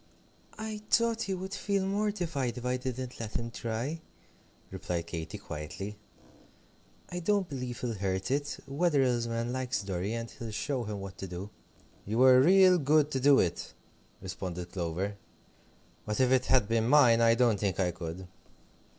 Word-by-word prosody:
"I 215 -1 -5
thought 230 -1 +3
he 195 - -1
would 190 +1 -6
feel 200 -2 0
mortified 180 - -1
if 125 - -6
I 125 0 +1
didn't 130 0 -5
let 110 -2 -6
him 115 0 -3
try," 120 +9 -3 0.7
replied 85 -2 -3
Katy, 80 -2 -5
quietly, 90 +7 -6 1.1
"I 180 - -4
don't 200 +1 +1
believe 125 -4 -5
he'll 120 -2 -2
hurt 95 +1 -2
it. 145 +1 -1
Wetherell's 135 -6 +1
man 115 +1 -2
likes 130 -2 -2
Dorry, 95 +2 -2
and 115 0 -4
he'll 115 - -7
show 125 +3 -2
him 105 -2 -5
what 95 -1 -8
to 95 - -5
do." 90 +3 -7 0.6
"You 110 +2 -1
were 130 0 +7
real 185 +3 +6
good 150 +1 +3
to 135 - 0
do 140 +1 +6
it," 85 -2 -1 0.5
responded 90 -2 -5
Clover; 95 +3 -3 0.9
"but 105 +3 -2
if 130 -1 +3
it 130 -1 +3
had 130 -5 +3
been 115 0 +1
mine 125 -4 +6
I 115 0 +5
don't 115 -4 +3
think 100 -3 -1
I 90 -2 +2
could." 85 +2 -7
120 Hz, 165 wpm, -30 LUFS, 100-145 Hz, 1.1 s, were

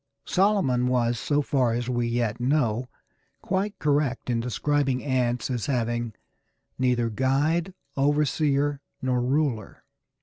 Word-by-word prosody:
Solomon 180 -11 +2
was, 120 -2 +1
so 145 0 +1
far 130 -4 +1
as 120 +1 -2
we 120 -2 0
yet 115 -1 -1
know, 125 -2 +1 0.5
quite 195 +2 -1
correct 145 -4 0
in 115 - +1
describing 135 +2 0
ants 125 -2 0
as 120 -4 -2
having 120 -3 -1 0.7
"neither 125 -3 +1
guide, 150 - +1 0.2
overseer, 145 0 +1 0.2
nor 125 -1 +1
ruler." 130 -5 -1
130 Hz, 115 wpm, -26 LUFS, 120-145 Hz, 0.7 s, Solomon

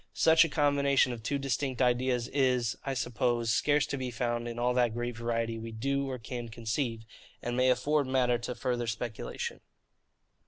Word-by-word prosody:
Such 160 0 +6
a 165 - -1
combination 140 -3 +3
of 115 - -7
two 140 +6 -1
distinct 135 -1 -2
ideas 125 -1 +2
is, 125 -4 +1
I 135 -1 -2
suppose, 120 -1 0
scarce 145 +3 +3
to 140 - -3
be 130 -1 -3
found 120 0 -2
in 120 0 -5
all 125 +1 +1
that 120 -2 +2
great 120 0 -3
variety 115 0 -2
we 115 0 -6
do 140 +5 -1
or 130 - -3
can 120 0 -6
conceive, 115 +1 -2 0.4
and 120 0 -2
may 130 +1 +3
afford 140 +3 +2
matter 125 -2 +2
to 120 +1 -5
further 120 -2 -2
speculation. 115 0 -4
125 Hz, 180 wpm, -30 LUFS, 120-135 Hz, 0.4 s, Such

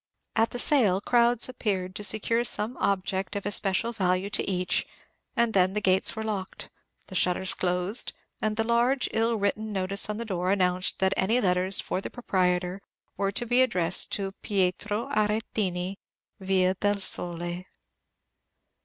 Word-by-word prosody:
At 225 +1 +3
the - - -6
sale 240 -9 +3
crowds 240 +2 +3
appeared 195 -7 -3
to 210 - -5
secure 230 +3 +1
some 230 +1 -1
object 190 0 -1
of 200 - -4
especial 205 +2 +1
value 185 -1 0
to - - +1
each; 180 -1 0 0.5
and 235 -1 +2
then 185 0 +3
the - - +2
gates 190 0 +2
were 220 - -4
locked, 200 -4 -5 0.3
the - - -12
shutters 180 +1 +2
closed, 180 +5 0 0.3
and 215 0 -1
a - - +3
large, 240 +3 +2
ill 225 +1 +1
written 215 +1 -1
notice 195 +1 +1
on 210 - -2
the 235 - -4
door 185 -3 -1
announced 185 -1 +1
that 190 0 +2
any 220 +6 +2
letters 185 -2 +2
for 185 - -3
the - - -6
proprietor 180 -4 -1 0.3
were 195 0 -1
to 240 +4 0
be 245 +2 +3
addressed 185 -10 +2
to 195 -2 -1
"Pietro 205 +2 -1
Arretini, 210 -3 -1 0.4
Via 190 -1 +2
del 205 +2 0
Sole." 175 -1 -1
200 Hz, 155 wpm, -27 LUFS, 185-220 Hz, 0.5 s, At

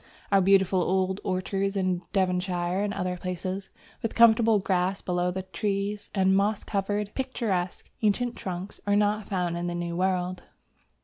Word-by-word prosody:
Our 195 -1 +5
beautiful 190 -1 +4
old 190 +2 0
orchards 195 +2 -1
in 185 -2 0
Devonshire 180 -1 0
and 205 0 0
other 180 -3 -2
places, 185 +2 -4 0.3
with 225 - -3
comfortable 230 -1 +6
grass 190 0 0
below 180 0 0
the 185 +1 -3
trees, 200 +2 -2
and 190 -1 +4
moss 200 +1 +1
covered, 205 0 -2
picturesque, 215 -9 -2
ancient 235 +3 +1
trunks, 185 +1 -6
are 205 - +3
not 210 0 +1
found 180 -3 -1
in 175 0 -2
the 175 - -2
New 170 0 -3
World. 185 0 0
190 Hz, 150 wpm, -27 LUFS, 180-205 Hz, 0.3 s, comfortable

